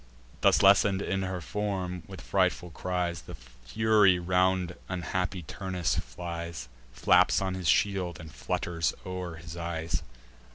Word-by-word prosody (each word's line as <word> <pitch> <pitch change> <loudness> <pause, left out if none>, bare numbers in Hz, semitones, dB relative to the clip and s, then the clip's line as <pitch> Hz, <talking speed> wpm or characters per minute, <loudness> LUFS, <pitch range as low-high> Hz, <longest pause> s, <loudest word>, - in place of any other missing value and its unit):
Thus - - +5
lessen'd 100 0 +6
in 95 0 -1
her 90 -1 -3
form, 95 0 -3
with - - -9
frightful 90 -1 0
cries 90 +1 -2
The - - -9
Fury 90 - +2
round 90 0 +1 0.2
unhappy 90 0 -2
Turnus 90 0 -2
flies, 85 0 -6 0.2
Flaps - - +4
on 95 -1 -1
his 95 -2 -3
shield, 95 -3 +2
and 80 -2 -10
flutters 85 -4 -1
o'er 90 -2 -5
his 80 0 -9
eyes. 85 -1 -3
90 Hz, 130 wpm, -29 LUFS, 85-95 Hz, 0.2 s, lessen'd